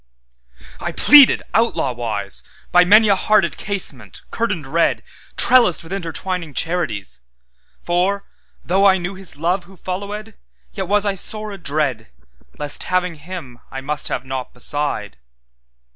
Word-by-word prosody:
'I - - -4
pleaded, 290 -3 +7
outlaw 225 - +1
wise, 110 -5 -3 0.3
By 180 0 +6
many 210 +4 +6
a 200 - +5
hearted 195 -2 +2
casement, 135 - -2
curtained 205 -10 -2
red, 165 +5 +1 0.3
Trellised 240 -10 +4
with 165 +3 -8
intertwining 175 -3 -4
charities;(For, 110 - -3 0.4
though 195 +3 +4
I 190 -1 +5
knew 180 +1 -4
His 190 -4 -10
love 175 +4 -1
Who 190 +1 -16
followèd, 205 +5 -5 0.4
Yet - - -4
was 205 +1 +2
I 200 - +1
sore 215 +2 -4
adreadLest, 130 - -4
having 180 -1 0
Him, 155 -6 -9
I 135 - -6
must 150 +2 0
have 125 - -2
naught 130 -1 -5
beside). 135 -5 -2
175 Hz, 130 wpm, -19 LUFS, 130-195 Hz, 0.4 s, pleaded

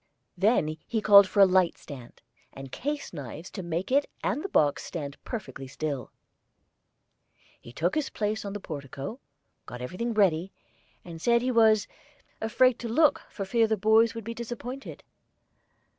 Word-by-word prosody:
Then 175 -5 +2
he 225 - -1
called 200 -2 +8
for 200 - +2
a - - +10
light 185 -2 +2
stand, 125 -4 -12 0.3
and 135 -1 -10
case 290 -3 -4
knives 145 +3 -8
to 195 - -6
make 170 +4 -3
it 280 +2 +2
and 225 +10 0
the 395 - -4
box 145 - +2
stand 145 -5 -6
perfectly 190 - -6
still. 140 -2 -4 1.5
He 120 - -13
took 165 +8 -1
his 305 -3 -1
place 215 0 -2
on 200 -1 -5
the 205 - -4
portico, 140 - -7 0.5
got 125 - -8
everything 200 - -4
ready, 190 -3 +2 0.5
and 165 -2 -9
said 235 +3 +3
he 255 - +1
was 220 -3 +4 0.5
"afraid 245 +3 +3
to 235 - -5
look 295 +5 +3
for 195 - -5
fear 225 +3 +2
the 220 0 0
boys 220 +3 +4
would 230 - -6
be 230 +3 -5
disappointed." 240 +3 -7
200 Hz, 160 wpm, -27 LUFS, 160-230 Hz, 1.5 s, a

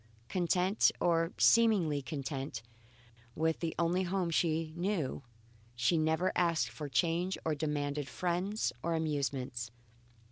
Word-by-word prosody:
Content, 180 +2 +2
or 165 0 +2
seemingly 200 -11 +4
content, 135 -4 -5 0.7
with 160 0 0
the 165 -2 -3
only 170 +2 +1
home 185 -1 -1
she 160 -1 0
knew, 175 -7 -1 0.5
she 120 +7 +2
never 160 +3 +2
asked 170 -2 +2
for 150 -2 -7
change 170 +8 +1
or 160 - +1
demanded 145 -1 -2
friends 180 +7 -1
or 170 0 0
amusements. 140 -6 -2
160 Hz, 115 wpm, -32 LUFS, 145-175 Hz, 0.7 s, seemingly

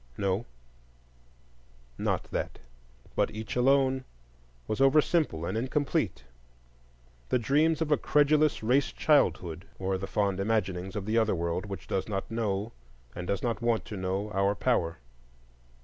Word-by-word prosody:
No, 100 +4 -1 1.5
not - - -1
that, - - -3 0.6
but - - +2
each 110 +1 -6
alone 130 +1 +3 0.6
was 110 +4 -1
over 135 +3 +6
simple 150 - +1
and - - -3
incomplete,—the - - -4
dreams 150 +7 +2
of 155 - -5
a 150 - +5
credulous 150 -2 +3
race 130 +5 +2
childhood, 90 - +1
or 95 0 -1
the 95 - -4
fond 100 -2 0
imaginings 95 -3 -1
of 100 -2 -3
the 110 +2 +2
other 110 -3 +2
world 85 +3 -2
which 100 -1 -6
does 95 +2 -2
not 100 +2 -3
know 110 -1 -1 0.4
and 90 - -6
does 100 -1 -1
not 120 -1 -1
want 120 -1 +1
to 105 - -7
know 95 +2 -2
our 100 0 +1
power. 95 -9 0
105 Hz, 140 wpm, -29 LUFS, 95-130 Hz, 1.5 s, over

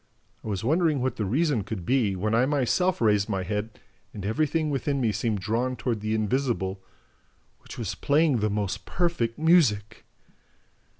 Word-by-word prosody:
I - - -8
was 100 -2 -3
wondering 155 +2 +2
what 130 +1 -2
the 105 - -1
reason 135 - +1
could 100 -4 -6
be, 120 -7 +1
when 105 +4 -1
I 120 +3 +3
myself 150 +6 +1
raised 105 -2 +3
my 95 -3 -1
head 105 +4 -4 0.4
and 100 -2 -6
everything 155 +7 0
within 140 0 -1
me 115 -4 +1
seemed 105 0 -1
drawn 120 +5 -1
toward 120 -3 -2
the 110 +1 -1
invisible, 110 -4 -1 0.8
WHICH - - -12
WAS - - -3
PLAYING 145 -1 +2
THE 110 -1 0
MOST 100 -2 -3
PERFECT 170 -11 -1
MUSIC! 135 - +2
115 Hz, 165 wpm, -26 LUFS, 105-145 Hz, 0.8 s, I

